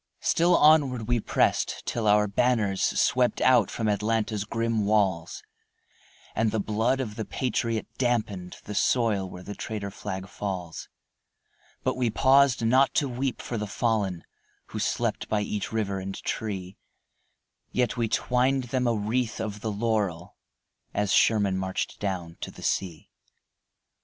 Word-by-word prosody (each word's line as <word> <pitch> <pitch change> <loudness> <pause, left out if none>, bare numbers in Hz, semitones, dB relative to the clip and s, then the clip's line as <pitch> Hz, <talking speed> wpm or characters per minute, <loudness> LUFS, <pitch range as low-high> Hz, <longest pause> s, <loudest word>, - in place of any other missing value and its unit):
Still 175 +2 +4
onward 140 -7 +4
we 120 -1 +2
pressed, - - 0
till 115 -2 -1
our 105 0 +4
banners 105 -2 +1
Swept 125 -1 +2
out 130 0 +4
from 110 - -2
Atlanta's 105 0 0
grim 115 0 -1
walls, 95 -5 0 0.9
And 110 0 +1
the 110 - -1
blood 110 +6 0
of 110 -5 -4
the 110 - -2
patriot 115 -1 -1
dampened 110 -8 -1
The 105 - -6
soil 105 -3 +1
where 90 0 -10
the 105 - -6
traitor 100 -1 -5
flag 95 -1 -6
falls; 95 -6 -5 0.9
But - - 0
we 125 -2 +1
paused 130 +1 +4
not 130 +4 +4
to 145 - +2
weep 130 +1 -3
for 120 - -3
the 105 - -3
fallen, 100 -5 -1 0.5
Who - - -5
slept - - -1
by 105 -1 +1
each 105 0 -3
river 100 -3 -1
and 95 +1 -5
tree; 95 -4 -4 0.9
Yet 125 -1 0
we 120 -2 0
twined 125 +4 +1
them 125 -1 +1
a 115 - +2
wreath 110 +3 -1
of 105 -1 -4
the 110 - -2
laurel 100 -5 -1 0.6
As 105 -1 +1
Sherman 100 -4 +3
marched 95 0 -3
down 90 -5 -4
to - - -4
the - - -12
sea. 85 -5 -2
110 Hz, 145 wpm, -27 LUFS, 100-120 Hz, 0.9 s, Still